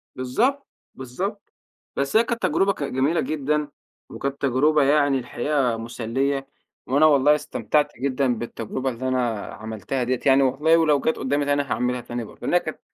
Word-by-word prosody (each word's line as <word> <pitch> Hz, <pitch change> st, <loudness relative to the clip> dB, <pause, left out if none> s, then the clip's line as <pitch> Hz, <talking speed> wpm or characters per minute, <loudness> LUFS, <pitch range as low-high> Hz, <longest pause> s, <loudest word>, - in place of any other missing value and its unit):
بالضبط. 235 Hz, -, 0 dB, 0.3 s
بالضبط. 185 Hz, -, -6 dB, 0.4 s
بس 140 Hz, +5 st, -2 dB
هي 225 Hz, -, +6 dB
كانت 235 Hz, -1 st, -3 dB
تجربة 195 Hz, +1 st, +2 dB
ك 145 Hz, -, -6 dB
جميلة 140 Hz, +5 st, 0 dB
جدًا. 150 Hz, 0 st, -1 dB, 0.4 s
وكانت 140 Hz, 0 st, -5 dB
تجربة 145 Hz, +3 st, +3 dB
يعني 145 Hz, -1 st, +3 dB
الحقيقة 125 Hz, 0 st, -1 dB
مُسلّية. 130 Hz, +4 st, -2 dB, 0.4 s
وأنا 140 Hz, +4 st, +4 dB
والله 150 Hz, 0 st, +5 dB
استمتعت 150 Hz, 0 st, 0 dB
جدًا 130 Hz, -2 st, 0 dB
بالتجربة 120 Hz, +3 st, -4 dB
اللي 130 Hz, +1 st, -4 dB
أنا 120 Hz, -5 st, -1 dB
عملتها 110 Hz, +4 st, -4 dB
ديّة 125 Hz, 0 st, -1 dB
يعني 135 Hz, 0 st, +5 dB
والله 150 Hz, +5 st, +3 dB
ولو 150 Hz, -3 st, +3 dB
جات 160 Hz, -, 0 dB
قدامِي 140 Hz, +2 st, 0 dB
تاني 145 Hz, 0 st, +2 dB
أنا 140 Hz, -, -8 dB
هاعملها 125 Hz, 0 st, -1 dB
تاني 120 Hz, 0 st, -5 dB
برضه، -, -, -13 dB
لأنها 175 Hz, -, +2 dB
كانت 155 Hz, -, -7 dB
135 Hz, 160 wpm, -23 LUFS, 125-150 Hz, 0.4 s, هي